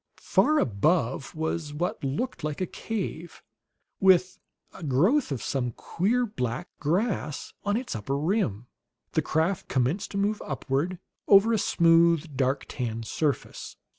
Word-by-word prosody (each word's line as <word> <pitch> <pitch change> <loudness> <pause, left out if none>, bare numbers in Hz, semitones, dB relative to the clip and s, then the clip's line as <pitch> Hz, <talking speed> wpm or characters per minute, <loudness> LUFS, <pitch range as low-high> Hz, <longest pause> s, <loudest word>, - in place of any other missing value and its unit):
Far 310 +1 +2
above 130 - +1
was 160 -1 -3
what 175 +1 -2
looked 145 - -3
like 150 -1 -3
a 185 - 0
cave, 180 -6 -5 0.6
with 185 0 +4 0.3
a - - -12
growth 170 - +2
of 135 - -3
some 125 -4 -1
queer, 230 - 0
black 125 - -4
grass 170 -1 -1
on 205 +1 +1
its 245 - -4
upper 125 +6 -2
rim. 150 - 0 0.5
The 160 - +1
craft 160 +5 0
commenced 135 +9 0
to 200 - -5
move 205 +2 0
upward, 140 +5 -2 0.3
over 205 +3 +6
a 220 - +2
smooth, 165 -4 +3
dark 135 +1 0
tan 115 -3 -4
surface. 145 +5 -3
160 Hz, 135 wpm, -27 LUFS, 135-195 Hz, 0.6 s, over